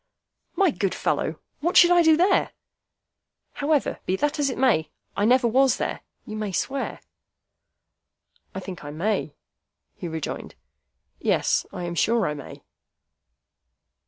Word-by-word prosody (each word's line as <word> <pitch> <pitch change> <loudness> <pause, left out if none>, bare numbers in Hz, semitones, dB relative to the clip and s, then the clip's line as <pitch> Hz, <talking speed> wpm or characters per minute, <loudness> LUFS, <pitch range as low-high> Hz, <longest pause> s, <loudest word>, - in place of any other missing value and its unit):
"My 390 -4 +3
good 195 -7 -1
fellow, - - -1 0.2
what 345 +4 +1
should 350 -1 +8
I 350 0 +6
do 320 -2 +5
there? 370 +3 +2 1.0
However, 290 -2 0
be 185 - +1
that 295 +8 -1
as 285 -1 +2
it 255 - -4
may, 160 -12 +2 0.3
I 205 - +1
never 245 +1 +4
was 265 +3 +3
there, - - -3 0.2
you 215 - -7
may 215 -2 -3
swear." 270 +8 -3 1.5
"I 190 - -4
think 185 -3 -8
I 145 - -7
may," 165 -1 -2 0.6
he 175 - -7
rejoined. 160 -2 -5 0.6
"Yes; - - +1
I - - -6
am 175 0 -3
sure 225 +5 +2
I 150 - -1
may." 145 -2 -10
230 Hz, 140 wpm, -24 LUFS, 180-295 Hz, 1.5 s, should